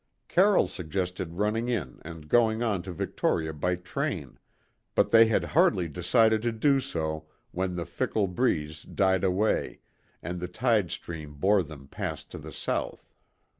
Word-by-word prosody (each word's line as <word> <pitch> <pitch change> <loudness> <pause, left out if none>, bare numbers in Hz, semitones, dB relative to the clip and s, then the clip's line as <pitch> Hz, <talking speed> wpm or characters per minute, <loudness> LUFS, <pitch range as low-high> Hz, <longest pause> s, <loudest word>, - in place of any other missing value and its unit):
Carroll 195 +2 +4
suggested 90 0 -4
running 105 +5 0
in 85 - -3
and 80 -2 -9
going 115 +3 +3
on 105 -6 0
to 95 - -7
Victoria 80 -1 -1
by 90 +4 0
train, 90 0 -4 0.6
but - - +3
they 115 0 +8
had 110 - +2
hardly 90 -2 +3
decided 110 - +3
to 120 +1 0
do 135 +5 +3
so 80 -8 -3 0.2
when 90 0 -2
the 85 -1 -3
fickle 105 -2 -1
breeze 80 -7 -1
died 95 -2 +1
away, 95 +3 +1 0.4
and 90 0 -4
the 90 - -3
tide 110 -1 +1
stream 75 -4 -7
bore 100 +6 +3
them 75 -4 -10
past - - -5
to - - -7
the - - -9
south. - - -4
90 Hz, 155 wpm, -28 LUFS, 80-110 Hz, 0.6 s, they